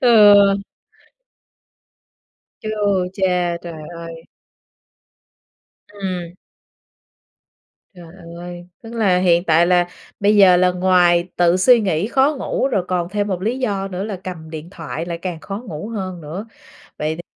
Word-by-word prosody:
Ừ. 215 -4 +7 2.3
Chu 215 - -5 0.4
cha, 180 -3 0
trời 165 -3 -8
ơi! 165 -1 -9 1.7
Ừm. 185 -4 -5 1.6
Trời 175 -2 -13 0.2
ơi. 175 0 -9 0.2
Tức 225 0 -10
là 195 -6 +2
hiện 175 -1 +3
tại 165 0 +4
là 175 0 +3 0.3
bây 205 +1 +3
giờ 190 -3 +7
là 180 0 +3
ngoài 180 -1 +3
tự 175 0 +3
suy 235 +5 +5
nghĩ 185 -2 0
khó 275 +4 +2
ngủ 270 - -1
rồi 195 -8 0
còn 175 -2 -1
thêm 205 +1 -2
một 185 -2 -3
lý 230 +6 -1
do 200 -6 -2
nữa 190 0 -4
là 210 -2 -4
cầm 160 -4 -7
điện 160 +1 -8
thoại 165 -2 -6
lại 170 -1 -4
càng 175 -3 -5
khó 200 +4 -6
ngủ 165 +2 -6
hơn 190 -6 -5
nữa. 165 +8 -7 0.5
Vậy 155 +1 -2
thì, 175 - -8
180 Hz, 140 wpm, -19 LUFS, 170-205 Hz, 2.3 s, Ừ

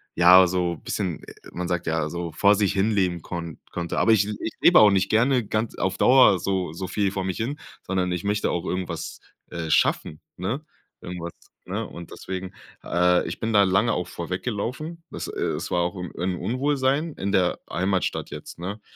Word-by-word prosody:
ja, 90 +2 +8
so 90 -1 -1
bisschen 90 0 -3
äh, - - -11 0.2
man 90 0 -3
sagt 90 -1 -2
ja, 80 -1 0
so 85 0 -4
vor 100 0 +4
sich 100 -2 +1
hin 100 +3 +1
leben 90 -4 0
konn 85 -3 -6
konnte. 85 -1 -3
Aber 115 - +4
ich 105 -2 +3
ich 105 +1 -4
lebe 175 - +7
auch 105 - +8
nicht 95 0 +1
gerne 120 +2 +3
ganz 110 +2 -2
auf 95 0 -1
Dauer 125 -7 +6
so 95 -1 -1
so 95 - -5
viel 100 +1 0
vor 95 -1 -3
mich 95 -1 -2
hin, 125 +6 -3 0.3
sondern 90 -1 -1
ich 90 -1 -3
möchte 105 +1 0
auch 85 +1 -2
irgendwas, 90 -1 -4 0.3
äh 80 -1 -4
schaffen, 75 0 +1 0.2
ne, 120 - -3 0.4
irgendwas, 90 -1 -6 0.3
ne, 105 +4 -3
und 85 -1 -10
deswegen 95 0 -6 0.3
äh, 90 0 +2
ich - - -5
bin 115 0 -2
da 100 -1 +6
lange 100 +5 +2
auch 90 - -2
vor 85 - -6
weggelaufen. 125 - -4
Dass - - -5
äh, - - -6
es - - -2
war 90 - +2
auch 90 +3 -2
im 90 -2 -6
'n 90 +2 -1
Unwohlsein 140 - 0
in 100 +1 -3
der 90 -2 +2
Heimatstadt 95 +3 -1
jetzt, - - -9
ne? 100 +5 -5
95 Hz, 200 wpm, -24 LUFS, 90-110 Hz, 0.4 s, ja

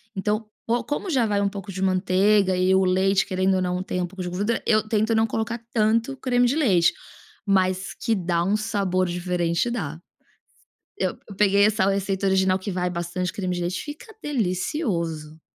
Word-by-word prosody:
então, 210 +3 -1 0.2
co 235 0 0
como 290 +8 -3
já 260 -8 +2
vai 205 -2 +1
um 200 - +1
pouco 195 -1 -7
de 190 +1 -6
manteiga 190 +1 +3
e 185 +1 +2
o 190 0 +4
leite, 190 +1 +2
querendo 190 0 +1
ou 185 - +1
não, 180 0 -1
tem 180 -1 -3
um - - 0
pouco 190 +1 -9
de 180 - -3
gordura, 205 +6 -1
eu 215 -1 +2
tento 220 +1 +1
não 220 0 +3
colocar 225 +2 -2
tanto 230 +4 +2
creme 245 -2 +2
de 255 - +1
leite, 195 - +3 0.5
mas 185 -1 +1
que 230 -2 -1
dá 175 -3 0
um 195 +4 +1
sabor 200 -4 0
diferente, 175 +2 -1
dá. 160 -10 -4 1.0
Eu - - -1 0.2
peguei 200 -1 +4
essa 210 -2 +3
receita 195 0 -1
original 190 -1 +3
que 195 +2 -5
vai 180 -1 -1
bastante 180 +1 -3
creme 185 -3 -2
de 175 - -3
leite, 175 +2 -2
fica 305 +9 -10
delicioso, 180 - -2
190 Hz, 185 wpm, -24 LUFS, 180-220 Hz, 1.0 s, o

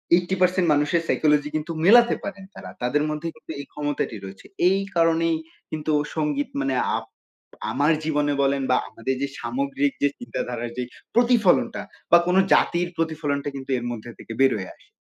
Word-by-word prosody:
80% 180 0 +2
মানুষের 150 +3 +2
সাইকোলজি 150 -1 +2
কিন্তু 155 +2 -2
মেলাতে 235 +4 +7
পারেন 200 0 -6
তারা। - - -9
তাদের 145 +5 +1
মধ্যে 155 +2 -3
কিন্তু 155 - -11
এই - - -10
ক্ষমতাটি 145 -5 -2
রয়েছে। 95 0 -10 0.2
এই 195 +1 +2 0.2
কারণেই 165 0 +3 0.4
কিন্তু 155 0 -2 0.2
সঙ্গীত 150 -2 -1
মানে 135 -1 0 0.2
আপ - - -6 0.7
আমার 145 +4 +2
জীবনে 150 -2 +1
বলেন 140 0 +1
বা 125 - +5
আমাদের 125 +4 -3
যে 140 - 0
সামগ্রিক 275 +1 -1
যে 145 - +5
চিন্তাধারার 120 - -4
যে 125 - -1 0.3
প্রতিফলনটা 235 -6 +3 0.3
বা 170 - +10
কোন 180 - +2 0.2
জাতির 175 0 +2
প্রতিফলনটা 150 -3 -1
কিন্তু 135 -1 -8
এর 120 - -5
মধ্যে 120 0 -7
থেকে 115 - -8
বের 135 0 +5
হয়ে 95 -2 -6
আসে। - - -26
150 Hz, 165 wpm, -24 LUFS, 140-180 Hz, 0.7 s, বা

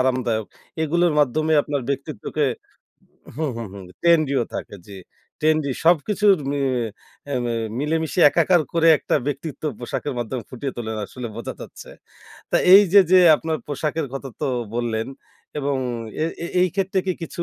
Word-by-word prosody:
আরামদায়ক। 125 -4 0 0.4
এগুলোর 170 +2 +2
মাধ্যমে 155 +4 +1
আপনার 145 -3 -3
ব্যক্তিত্বকে 140 +1 -2 0.9
হু, 160 - -2
হু, 115 - -4
হু, 100 - -9 0.2
ট্রেন্ডি 165 -4 +3
ও - - -2
থাকে - - -6
জ্বি। 100 -1 -10 0.4
ট্রেন্ডি 155 -2 +2
সবকিছুর 190 +4 +4
মি 145 - -1 0.7
এ্যা 140 -2 -2
ম্যা 120 -1 -1 0.2
মিলেমিশে 160 +3 -1
একাকার 175 +1 +3
করে 165 0 +3
একটা - - -2
ব্যক্তিত্ব 145 +1 -4 0.2
পোশাকের 125 +3 -4
মাধ্যমে 120 +1 -3
ফুটিয়ে 135 +1 -5
তোলেন, 110 -2 -4
আসলে 125 -2 -7
বোঝা 115 - -5
যাচ্ছে। - - -11 0.6
তা - - +3 0.2
এই 200 +2 +10
যে, 205 - +9
যে, 185 - +7 0.2
আপনার 160 0 -2
পোশাকের 150 +1 -2
কথা 135 0 -5
তো 150 - 0 0.3
বললেন। 115 -1 -2 0.5
এবং 140 -1 -1 0.5
এ - - +2 0.4
এই 185 - +4
ক্ষেত্রে 195 -1 0
কি 185 - +1
কিছু 170 +1 -4
145 Hz, 150 wpm, -22 LUFS, 130-165 Hz, 0.9 s, এই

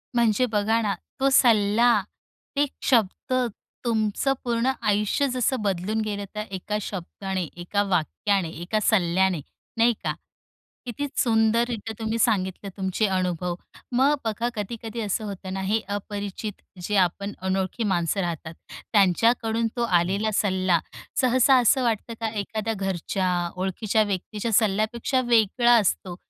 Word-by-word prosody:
म्हणजे 235 +1 +3
बघा 220 +2 +2
ना 205 -2 0 0.3
तो 275 - +3
सल्ला, 230 -1 +4 0.6
एक 285 -1 +2 0.2
शब्द 230 0 +1 0.5
तुमचं 220 +4 +1
पूर्ण 240 +2 +1
आयुष्य 210 +7 +1
जसं 255 +1 0
बदलून 200 +2 -1
गेलं 205 -2 -3
त्या 210 0 -3
एका 195 +2 -3
शब्दाने, 190 0 -4
एका 180 +4 -1
वाक्याने, 180 +1 0
एका 175 +7 -2
सल्ल्याने 185 -3 +2 0.4
नाही 235 +1 +4
का? - - 0 0.7
किती 250 +4 -3
सुंदररित्या 225 -1 +1
तुम्ही 225 +1 -1
सांगितले 195 -3 0
तुमचे 190 +2 0
अनुभव. 180 -1 -1 0.4
मग 265 +4 +4
बघा 225 +2 -1
कधी-कधी 225 +2 -5
असं 215 +1 -1
होतं 195 -2 -6
ना 190 - -3
हे 220 - +3 0.2
अपरिचित 205 0 -5 0.2
जे 210 +4 -2
आपण 200 +3 -3
अनोळखी 190 +4 -1
माणसं 190 -1 0
राहतात. 170 -2 -4 0.4
त्यांच्याकडून 225 +4 +3
तो 240 - +1 0.2
आलेला 200 +5 0
सल्ला, 185 -4 +2 0.4
सहसा 255 +1 +5
असं 255 +2 +3
वाटतं 230 0 -1
का 225 - 0
एखाद्या 215 +1 -3
घरच्या, 185 -2 -1
ओळखीच्या 195 +4 0
व्यक्तीच्या 205 +3 -3
सल्ल्यापेक्षा 220 +5 +2
वेगळा 235 +1 +4
असतो. 185 -3 -1
210 Hz, 130 wpm, -25 LUFS, 190-230 Hz, 0.7 s, सहसा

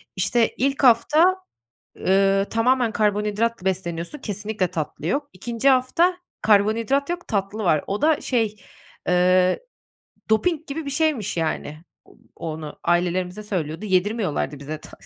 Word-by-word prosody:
işte, 215 +5 +1
ilk 275 +2 0
hafta, 300 +9 +5 0.6
eee, 195 +1 +3
tamamen 235 0 +2
karbonhidratla 210 0 0
besleniyorsun, 175 - -3
kesinlikle 205 -3 -2
tatlı 160 -3 -4
yok. 285 - -1
2. 230 +7 -1
hafta 275 +8 +3 0.3
karbonhidrat 220 +8 +2
yok, 350 0 -4
tatlı 205 +1 -2
var. 155 -4 +2
O 200 +5 -3
da 310 -1 +3
şey, 225 -4 0 0.5
eee, 180 - +3 0.7
doping 320 +8 +1
gibi 295 +2 -5
bir 280 - -4
şeymiş 275 - 0
yani. 155 -1 -3 0.3
O - - -21 0.2
onu 155 -2 -6
ailelerimize 180 +3 0
söylüyordu, 175 -2 -3
yedirmiyorlardı 190 - 0
bize 150 +2 -6
ta - - -13
210 Hz, 130 wpm, -23 LUFS, 180-255 Hz, 0.7 s, hafta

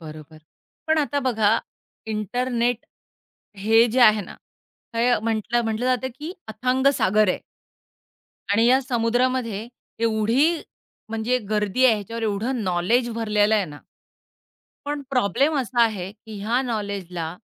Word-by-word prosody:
बरोबर. 155 -1 -11 0.5
पण 315 0 +2
आता 285 -1 0
बघा 225 -4 +2 0.5
इंटरनेट 240 +2 -1 0.7
हे 225 +3 +4
जे 255 +4 +1
आहे 215 -3 +6
ना 180 - -9 0.6
तर, 230 - -2
हे 240 -1 +3
म्हटलं 230 +1 0
म्हटलं 225 +3 -1
जातं, 255 0 +1
की 315 +4 -6 0.2
अथांग 250 +5 0
सागर 210 +2 +3
आहे. - - -1 1.1
आणि 225 +3 +4
या 260 +2 +5
समुद्रामध्ये 240 -2 0 0.3
एवढी 230 +5 +2 0.6
म्हणजे 225 +3 0
गर्दी 210 +4 +1
आहे. 240 - +6
ह्याच्यावर 225 +2 -6
एवढं 220 +3 -1
नाॅलेज 190 +8 +1
भरलेलं 210 -1 +2
आहे 205 -3 +2
ना. 145 -3 -10 1.1
पण 290 0 -3
प्रॉब्लेम 265 +5 +2
असा 245 -1 +1
आहे 195 -5 0
की 220 -1 -11
ह्या 235 +5 +1
नाॅलेजला, 195 -7 -4
225 Hz, 130 wpm, -23 LUFS, 210-250 Hz, 1.1 s, आहे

